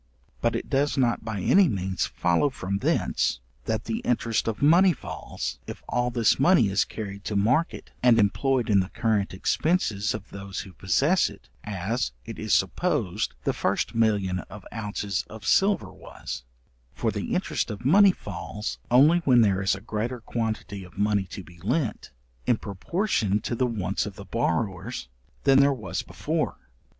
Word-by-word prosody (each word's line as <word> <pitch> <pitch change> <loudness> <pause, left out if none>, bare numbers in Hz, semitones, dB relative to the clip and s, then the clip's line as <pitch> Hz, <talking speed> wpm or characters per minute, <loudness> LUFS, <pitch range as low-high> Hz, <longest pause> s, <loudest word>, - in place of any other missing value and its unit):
But - - +1
it - - -3
does 140 +2 +1
not 120 -3 +1
by 110 -3 -4
any 190 - +5
means 95 -3 -1
follow 85 +11 +1
from 100 -6 -3
thence, - - +1 0.3
that 110 - -1
the 225 - -2
interest 240 - 0
of 110 -2 -2
money 175 +5 +6
falls, - - -6
if - - -8
all 120 0 0
this 120 -2 +2
money 135 - +5
is 95 +1 +2
carried 100 -2 -7
to 105 - -2
market, 125 +12 +1
and 120 -2 +5
employed 120 +4 +2
in 100 -2 +4
the 95 0 -1
current 110 -4 0
expences 110 - 0
of 105 -2 -9
those 100 -1 -6
who 95 - -11
possess 140 - +2
it, 100 - -15
as 100 - -2
it - - -7
is - - -3
supposed - - +1
the - - +1
first - - -1
million 105 -5 +1
of 105 -2 -10
ounces 105 -3 -2
of 110 -2 -10
silver 195 - +2
was; - - -8 0.5
for - - 0
the - - -3
interest - - -1
of 110 +3 -7
money 195 +7 +7
falls 105 - -6
only 145 +8 +6
when 130 -7 +4
there 100 -3 +3
is 95 0 +2
a 95 - -9
greater 115 +5 -3
quantity 110 -4 -3
of 90 - -15
money 105 -1 +1
to 95 +1 -8
be 85 +1 -16
lent, 120 - -1 0.4
in 120 - +4
proportion 105 - -1
to 120 - -4
the 125 +2 +1
wants 100 -4 -2
of 100 - -8
the 100 -1 -10
borrowers, 95 - -2 0.3
than 135 0 +6
there 140 0 +5
was 125 -6 -3
before. - - -2
110 Hz, 170 wpm, -26 LUFS, 100-130 Hz, 0.5 s, money